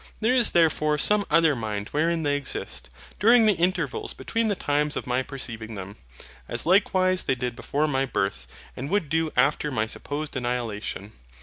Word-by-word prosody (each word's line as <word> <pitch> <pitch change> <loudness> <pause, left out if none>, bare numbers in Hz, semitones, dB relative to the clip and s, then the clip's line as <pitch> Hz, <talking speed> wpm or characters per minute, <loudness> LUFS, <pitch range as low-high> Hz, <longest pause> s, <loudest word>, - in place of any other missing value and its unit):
There 225 +3 +2
is 245 -3 +4
therefore 155 -3 +2
some 205 +6 +3
other 160 -1 +4
Mind 105 -3 -4
wherein 165 +2 0
they 145 -1 +1
exist, 145 - -4 0.3
during 230 +2 +6
the 215 - +5
intervals 175 -5 -1
between 230 0 -1
the 205 - 0
times 150 -3 0
of - - -4
my 125 +1 0
perceiving 115 -5 -5
them: 100 +1 -8 0.5
as - - 0
likewise 185 0 +3
they 130 - +1
did 125 -1 -3
before 150 +5 -1
my 135 -2 +1
birth, 100 - -2 0.3
and 135 +3 -5
would 190 -5 0
do 160 0 0
after 145 +3 +2
my 110 -6 0
supposed 145 +7 -5
annihilation. 120 -5 -3
145 Hz, 175 wpm, -25 LUFS, 125-170 Hz, 0.5 s, during